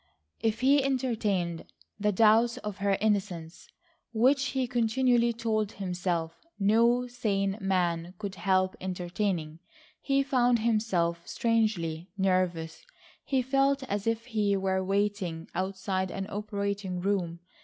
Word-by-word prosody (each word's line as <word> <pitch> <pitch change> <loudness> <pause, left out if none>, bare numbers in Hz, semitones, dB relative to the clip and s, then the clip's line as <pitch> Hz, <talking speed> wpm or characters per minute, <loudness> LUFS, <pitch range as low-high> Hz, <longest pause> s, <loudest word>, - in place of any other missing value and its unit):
If 225 0 -1
he 275 +2 +5
entertained 215 -10 -1 0.4
the 210 0 +2
doubts 225 +3 +4
of 210 -2 -6
her 200 -1 +1
innocence 190 -6 -2 0.5
which 260 +5 +3
he 265 -1 -1
continually 240 0 +2
told 220 -2 -1
himself 180 -3 -3
no 230 +4 +3
sane 200 -5 -1
man 180 -2 0
could 200 -1 -5
help 185 -1 +1
entertaining, 180 -3 -2 0.4
he 275 -1 +2
found 250 -3 +3
himself 195 -7 0
strangely 200 -8 0
nervous. 185 -4 0 0.4
He 265 -2 0
felt 275 +1 +2
as 205 -4 -3
if 230 0 0
he 210 -5 +1
were 190 0 0
waiting 195 -4 -1
outside 190 0 -2
an 195 +1 -4
operating 200 -2 -3
room. 175 -3 -1
200 Hz, 120 wpm, -29 LUFS, 185-230 Hz, 0.5 s, he